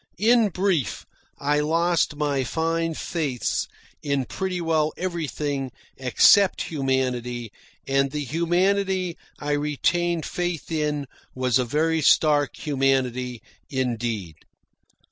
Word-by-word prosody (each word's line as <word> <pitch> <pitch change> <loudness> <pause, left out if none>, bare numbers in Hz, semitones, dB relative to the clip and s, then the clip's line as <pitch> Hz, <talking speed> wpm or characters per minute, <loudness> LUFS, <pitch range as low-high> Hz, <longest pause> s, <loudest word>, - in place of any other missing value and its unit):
In 225 +2 +4
brief, 185 -6 -1 0.3
I 145 +1 +1
lost 165 +1 +1
my 145 -2 0
fine 165 +3 -1
faiths 150 -9 -2 0.3
in 140 -3 0
pretty 190 +3 -3
well 160 -2 +1
everything 150 -6 -3 0.2
except 175 +9 +4
humanity, 125 -5 -2 0.4
and 135 0 +2
the 150 +1 -3
humanity 180 +4 +1 0.2
I 145 0 -3
retained 155 +3 0
faith 175 -2 -3
in 150 -2 -1 0.3
was 130 -2 +2
a 125 - +1
very 160 +5 +1
stark 145 -1 +3
humanity 130 -4 0 0.3
indeed. 115 - -2
150 Hz, 105 wpm, -24 LUFS, 130-170 Hz, 0.4 s, In